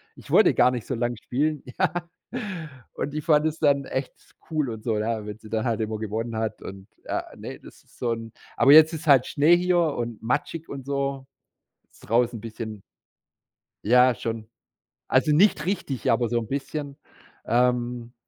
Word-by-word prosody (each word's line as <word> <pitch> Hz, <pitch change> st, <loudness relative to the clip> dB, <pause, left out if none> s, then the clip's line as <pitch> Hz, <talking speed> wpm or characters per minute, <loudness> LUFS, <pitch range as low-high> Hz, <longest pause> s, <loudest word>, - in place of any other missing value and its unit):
Ich -, -, -15 dB
wollte -, -, +5 dB
gar -, -, +5 dB
nicht 125 Hz, -3 st, -4 dB
so -, -, -3 dB
lange 120 Hz, 0 st, -1 dB
spielen, 150 Hz, +6 st, -1 dB, 0.2 s
ja. 185 Hz, -4 st, +3 dB, 1.0 s
Und 145 Hz, -, -3 dB
die 155 Hz, -, -2 dB
fand 150 Hz, 0 st, +3 dB
das 155 Hz, +1 st, -4 dB
dann 140 Hz, -2 st, +3 dB
echt 130 Hz, 0 st, -3 dB, 0.4 s
cool 155 Hz, -4 st, 0 dB
und 110 Hz, -2 st, -7 dB
so, 110 Hz, -3 st, 0 dB
ja, 110 Hz, -1 st, -2 dB
wenn 105 Hz, 0 st, -7 dB
sie 110 Hz, -, -13 dB
dann 110 Hz, +1 st, -1 dB
halt 115 Hz, -2 st, 0 dB
immer 110 Hz, 0 st, -2 dB
gewonnen 110 Hz, +2 st, -3 dB
hat 110 Hz, 0 st, -3 dB
und 95 Hz, 0 st, -9 dB, 0.2 s
ah, -, -, -2 dB
ne, -, -, -8 dB
das -, -, -16 dB
ist -, -, -24 dB
so 120 Hz, -1 st, 0 dB
'n 115 Hz, 0 st, -7 dB, 0.3 s
aber 140 Hz, -, +7 dB
jetzt 155 Hz, +1 st, +9 dB
ist 160 Hz, -1 st, -6 dB
halt 135 Hz, -3 st, +6 dB
Schnee 155 Hz, +4 st, +4 dB
hier 180 Hz, 0 st, +2 dB
und 120 Hz, -9 st, -2 dB
matschig 150 Hz, +7 st, -2 dB
und 135 Hz, -2 st, -7 dB
so. 140 Hz, -1 st, -2 dB, 0.7 s
Ist -, -, -22 dB
draußen 120 Hz, +1 st, +2 dB
'n -, -, -14 dB
bisschen 110 Hz, -2 st, -7 dB, 1.0 s
Ja, 125 Hz, +2 st, +5 dB
schon. 115 Hz, -1 st, -5 dB, 0.6 s
Also, 135 Hz, +4 st, +3 dB
nicht 165 Hz, 0 st, +4 dB
richtig, 150 Hz, -, -2 dB
aber 115 Hz, +1 st, +2 dB
so 120 Hz, +1 st, 0 dB
'n 115 Hz, -, -6 dB
bisschen. 140 Hz, +1 st, -4 dB, 0.5 s
Ähm, 120 Hz, 0 st, 0 dB
125 Hz, 185 wpm, -25 LUFS, 115-145 Hz, 1.0 s, jetzt